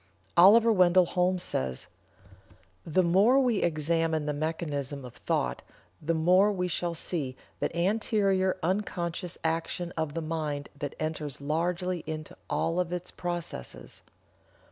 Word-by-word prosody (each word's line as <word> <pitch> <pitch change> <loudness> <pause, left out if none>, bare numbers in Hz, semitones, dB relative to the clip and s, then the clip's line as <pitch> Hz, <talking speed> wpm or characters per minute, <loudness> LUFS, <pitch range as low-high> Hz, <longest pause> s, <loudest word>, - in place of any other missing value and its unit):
Oliver 220 +6 +7
Wendell 180 -2 +5
Holmes 180 +1 +1
says: 65 -1 -2 1.0
"The 175 +4 +3
more 200 +10 +5
we 245 -6 +2
examine 160 -1 +1
the 150 - -1
mechanism 145 -3 -3
of 125 - -10
thought 60 0 -2 0.4
the 165 +2 0
more 180 +6 +4
we 180 -2 -1
shall 175 -1 -1
see 145 -6 -2 0.2
that - - -2
anterior 195 0 +1
unconscious 175 -1 -2
action 165 +2 -2
of 160 -2 -2
the 165 - -1
mind 155 -3 -3
that 145 -1 -4
enters 155 -3 -3
largely 175 +5 -1
into 155 -1 -6
all 165 +2 0
of 175 -1 -1
its 180 0 -4
processes. 175 - -6
170 Hz, 130 wpm, -28 LUFS, 155-185 Hz, 1.0 s, Oliver